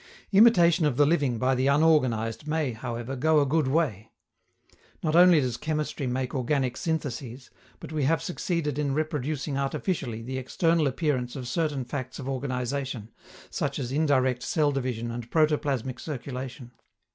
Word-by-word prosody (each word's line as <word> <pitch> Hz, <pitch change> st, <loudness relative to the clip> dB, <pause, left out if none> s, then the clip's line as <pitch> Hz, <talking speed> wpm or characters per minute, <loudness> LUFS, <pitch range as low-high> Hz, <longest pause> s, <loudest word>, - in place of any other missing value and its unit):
Imitation 185 Hz, -5 st, +6 dB
of 130 Hz, -4 st, -1 dB
the 145 Hz, -, +5 dB
living 145 Hz, -6 st, +1 dB
by 130 Hz, +3 st, +2 dB
the 130 Hz, +1 st, +1 dB
unorganized 140 Hz, -5 st, +2 dB
may, 155 Hz, -3 st, 0 dB
however, 120 Hz, +2 st, -5 dB
go 155 Hz, +4 st, +3 dB
a 145 Hz, -, +3 dB
good 150 Hz, +1 st, +1 dB
way. 130 Hz, -, 0 dB, 0.9 s
Not 155 Hz, -1 st, +1 dB
only 175 Hz, -2 st, +7 dB
does 125 Hz, -4 st, -1 dB
chemistry 150 Hz, -3 st, -2 dB
make 125 Hz, 0 st, -2 dB
organic 130 Hz, -1 st, 0 dB
syntheses, 135 Hz, -5 st, -4 dB, 0.3 s
but -, -, -9 dB
we 150 Hz, -3 st, 0 dB
have 165 Hz, +4 st, +2 dB
succeeded 170 Hz, -6 st, -2 dB
in 140 Hz, -2 st, 0 dB
reproducing 150 Hz, -2 st, -2 dB
artificially 135 Hz, -, -2 dB
the 130 Hz, +2 st, -4 dB
external 165 Hz, +4 st, +1 dB
appearance 130 Hz, -3 st, -1 dB
of 130 Hz, -3 st, -5 dB
certain 150 Hz, -3 st, -1 dB
facts 130 Hz, 0 st, -5 dB
of 135 Hz, -, -7 dB
organization, 130 Hz, -3 st, -3 dB, 0.4 s
such -, -, -2 dB
as 125 Hz, -3 st, -4 dB
indirect 130 Hz, -4 st, +2 dB
cell 150 Hz, 0 st, +1 dB
division 125 Hz, -4 st, -3 dB
and 120 Hz, 0 st, -6 dB
protoplasmic 145 Hz, -5 st, +1 dB
circulation. 130 Hz, -3 st, -6 dB
135 Hz, 150 wpm, -27 LUFS, 125-155 Hz, 0.9 s, only